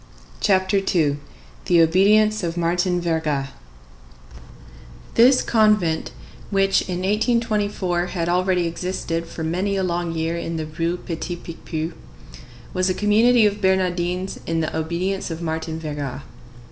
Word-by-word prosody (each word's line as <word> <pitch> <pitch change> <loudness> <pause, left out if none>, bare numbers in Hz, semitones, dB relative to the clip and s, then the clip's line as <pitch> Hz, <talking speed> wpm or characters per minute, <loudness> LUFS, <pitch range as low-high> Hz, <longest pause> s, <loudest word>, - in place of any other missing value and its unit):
CHAPTER 190 0 +2 0.2
II—THE 145 - -1
OBEDIENCE 210 +6 +4
OF 170 -1 -3
MARTIN 175 +1 +1
VERGA 155 -5 -1 1.6
This 255 +3 +5
convent, 210 -8 +2 0.4
which 195 -1 +3
in 180 0 -2
1824 205 -4 0
had 170 -2 -3
already 180 0 +1
existed 170 -1 -3
for 165 - -6
many 185 +5 -1
a 190 - 0
long 175 -1 -1
year 165 +1 -1
in 165 -1 -4
the 160 - -3
Rue 165 +3 -2
Petit 175 +1 -5
Picpus, 165 -1 -6 0.8
was 185 0 +1
a 185 - 0
community 220 +3 +4
of 205 0 0
Bernardines 185 -1 0
of 165 0 -2
the 155 - -3
obedience 175 +5 -2
of 165 -1 -5
Martin 160 -1 -3
Verga. 145 -4 -5
175 Hz, 125 wpm, -22 LUFS, 165-195 Hz, 1.6 s, This